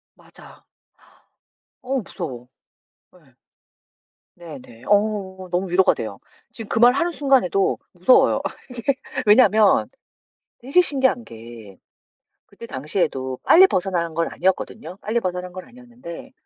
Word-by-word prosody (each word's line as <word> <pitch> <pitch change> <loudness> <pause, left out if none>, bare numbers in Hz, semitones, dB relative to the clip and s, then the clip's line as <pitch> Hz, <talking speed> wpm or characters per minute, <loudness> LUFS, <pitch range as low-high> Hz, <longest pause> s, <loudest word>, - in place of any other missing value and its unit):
맞아. - - -17 1.2
어 260 +1 -2
무서워. 130 - -8 0.7
예. - - -24 1.0
네네. 130 -8 -12
어 200 -3 0
너무 180 +2 -1
위로가 185 +2 +3
돼요. - - -6 0.3
지금 225 -3 -10
그 - - -2
말하는 250 +9 +4
순간에도 260 - +1
무서워요. 180 +8 +4
어 - - -4 0.3
그게 250 +2 -2 0.3
왜냐하면 210 -1 +5 0.7
되게 275 +8 +3
신기한 265 -7 0
게 115 - -12 0.7
그때 230 - -12
당시에도 135 - -3
빨리 370 +3 +7
벗어난 180 - -2
건 165 0 -1
아니었거든요. 190 +2 -3
빨리 220 +3 -1
벗어난 180 -3 -4
건 185 0 -9
아니었는데 245 -3 -12
195 Hz, 265 characters per minute, -21 LUFS, 170-245 Hz, 1.2 s, 빨리